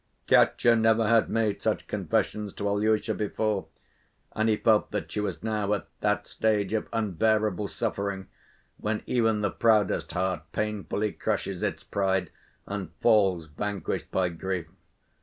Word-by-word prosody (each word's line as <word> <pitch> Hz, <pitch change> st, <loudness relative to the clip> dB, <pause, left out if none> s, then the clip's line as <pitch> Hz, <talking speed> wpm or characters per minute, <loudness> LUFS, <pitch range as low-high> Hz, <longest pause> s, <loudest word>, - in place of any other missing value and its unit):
Katya 120 Hz, -1 st, +5 dB
never 110 Hz, 0 st, +3 dB
had 115 Hz, 0 st, +4 dB
made 110 Hz, -3 st, 0 dB
such -, -, 0 dB
confessions 105 Hz, -2 st, -1 dB
to 100 Hz, -, -2 dB
Alyosha 110 Hz, +2 st, +1 dB
before, 105 Hz, -1 st, -1 dB, 0.6 s
and 110 Hz, +1 st, +1 dB
he 110 Hz, -, +3 dB
felt 110 Hz, -1 st, +3 dB
that -, -, -4 dB
she -, -, -2 dB
was 100 Hz, -3 st, -3 dB
now 105 Hz, -2 st, -1 dB
at 100 Hz, -, -6 dB
that 105 Hz, 0 st, 0 dB
stage 105 Hz, -2 st, 0 dB
of 110 Hz, -, -1 dB
unbearable 110 Hz, -1 st, +1 dB
suffering 100 Hz, -3 st, -3 dB, 0.5 s
when 105 Hz, 0 st, -2 dB
even 115 Hz, -3 st, +1 dB
the 105 Hz, -2 st, 0 dB
proudest 110 Hz, -4 st, +2 dB
heart 95 Hz, -2 st, -1 dB
painfully 105 Hz, 0 st, -1 dB
crushes -, -, -2 dB
its -, -, -2 dB
pride 95 Hz, -3 st, 0 dB, 0.3 s
and 100 Hz, -4 st, -4 dB
falls 95 Hz, -7 st, +3 dB
vanquished 100 Hz, +6 st, -4 dB
by 90 Hz, -1 st, +1 dB
grief. 90 Hz, 0 st, -3 dB
105 Hz, 140 wpm, -27 LUFS, 95-110 Hz, 0.6 s, Katya